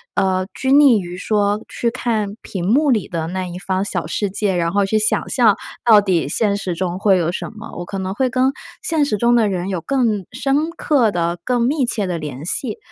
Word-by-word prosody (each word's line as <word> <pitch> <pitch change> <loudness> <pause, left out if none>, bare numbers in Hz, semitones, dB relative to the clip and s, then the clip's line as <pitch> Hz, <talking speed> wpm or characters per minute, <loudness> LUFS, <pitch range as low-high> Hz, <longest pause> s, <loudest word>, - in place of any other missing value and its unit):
呃， 185 -1 +1
拘 265 0 -1
泥 280 -7 +6
于 180 -1 -7
说 205 +1 0
去 235 - -1
看 220 -5 -2
屏 180 -3 -5
幕 280 +7 +3
里 215 -6 +1
的 165 -2 -3
那 185 +2 -3
一 175 +1 -7
方 190 +1 -1
小 175 -5 -2
世 205 +4 -1
界， 195 -1 -1
然 170 -1 0
后 200 0 +2
去 215 +2 +1
想 215 - 0
象 230 -6 +4 0.3
到 215 -3 +7
底 185 -6 0
现 200 +6 0
实 185 -3 -3
中 180 +1 -3
会 195 -2 +4
有 170 -1 0
什 - - -5
么， 225 +2 -9
我 175 - -5
可 195 - -5
能 190 0 -3
会 255 +4 0
跟 255 +2 +2 0.3
现 320 -6 +1
实 210 - -1
中 235 +3 +3
的 225 -3 +3
人 185 0 -2
有 185 - -2
更 230 -8 0
深 280 +5 0
刻 275 - +2
的、 170 0 -1
更 245 -2 +1
密 270 +2 +1
切 215 -4 -1
的 175 - -2
联 150 -2 -6
系。 220 +4 -2
205 Hz, 240 characters per minute, -19 LUFS, 185-240 Hz, 0.3 s, 到